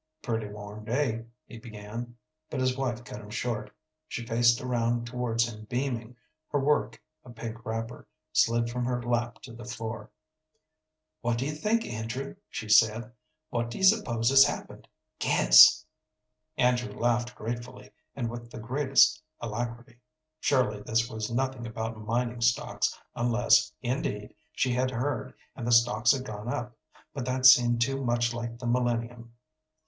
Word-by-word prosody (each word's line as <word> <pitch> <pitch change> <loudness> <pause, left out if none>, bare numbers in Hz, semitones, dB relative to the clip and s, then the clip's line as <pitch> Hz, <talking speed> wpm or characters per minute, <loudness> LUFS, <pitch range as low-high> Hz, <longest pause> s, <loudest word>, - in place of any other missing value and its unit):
"Pretty 110 -3 -2
warm 105 +1 -9
day," 115 -1 -1 0.2
he 115 - -11
began, 115 +1 -8 0.3
but 145 - -3
his 130 0 +1
wife 125 -3 -2
cut 105 - -9
him 105 - -12
short. 115 -1 -3 0.4
She 120 - -5
faced 120 +1 +3
around 120 -1 -1
towards 120 -1 0
him 110 -2 -9
beaming, 125 -1 -3 0.3
her 145 - 0
work 145 +2 +1 0.2
a - - -14
pink 115 0 -7
wrapper 115 0 -5 0.3
slid 115 0 +3
from 125 +1 -3
her 125 0 -1
lap 120 0 -2
to 115 - -10
the 120 +1 -10
floor. 115 -3 -6 1.1
"What 120 0 0
do 130 - -2
you 150 - -1
think, 215 +9 0
Andrew?" 115 - -5
she 110 - -6
said. 110 +1 +4 0.4
"What 120 0 -1
do - - -7
you - - -4
s'pose 130 - +3
has 135 0 +9
happened? - - -4 0.3
Guess." - - +7 0.7
Andrew 125 -3 +2
laughed 120 +2 0
gratefully, 120 -1 -6 0.2
and 125 -4 -2
with 120 0 -7
the 120 - -10
greatest 135 +6 +3 0.2
alacrity. 120 +2 -5 0.4
Surely 110 -7 +1
this 115 +2 0
was 110 -1 -4
nothing 130 -1 -2
about 110 0 -5
mining 120 +2 -1
stocks, 115 0 +1 0.2
unless, 120 0 +3
indeed, 120 -5 -3 0.2
she 130 -1 0
had 130 +1 +1
heard, 125 -2 -3 0.2
and 120 -3 -5
the - - +1
stocks 120 -1 +5
had 130 -1 -1
gone 105 -1 -7
up, 120 0 -4 0.4
but 135 - -4
that 130 0 -1
seemed 120 -2 +7
to 135 +2 0
much 120 -1 +1
like 120 0 -5
the 120 - -8
millennium. 120 -1 -1
120 Hz, 155 wpm, -28 LUFS, 115-125 Hz, 1.1 s, has